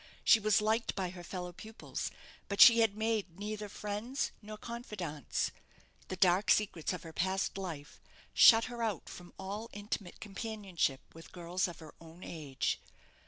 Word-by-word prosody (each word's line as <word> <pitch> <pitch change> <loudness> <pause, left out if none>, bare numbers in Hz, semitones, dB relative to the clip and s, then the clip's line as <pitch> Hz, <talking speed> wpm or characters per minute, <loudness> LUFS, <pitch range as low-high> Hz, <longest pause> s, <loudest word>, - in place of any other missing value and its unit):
She 225 - +7
was 215 0 +3
liked 220 +2 +1
by 185 -3 -2
her 175 -1 -9
fellow 180 0 -5
pupils; 220 +5 -6 0.4
but 200 - -3
she 235 -2 +10
had 220 -2 +3
made 215 -5 -1
neither 210 0 -4
friends 210 +7 -3
nor 215 0 -8
confidantes. 210 - -4 0.6
The 185 - -4
dark 185 +2 +3
secrets 195 -6 +2
of 180 - -5
her 165 -1 -9
past 190 +3 0
life 165 -7 -6 0.3
shut 225 -1 +8
her 240 -1 -5
out 220 -4 -2
from 175 0 -10
all 205 +4 -5
intimate 205 -3 -5
companionship 195 - -2
with 165 0 -13
girls 180 +1 -1
of 175 - -8
her 155 -2 -12
own 165 +2 -13
age. 145 -5 -2
195 Hz, 160 wpm, -33 LUFS, 175-215 Hz, 0.6 s, she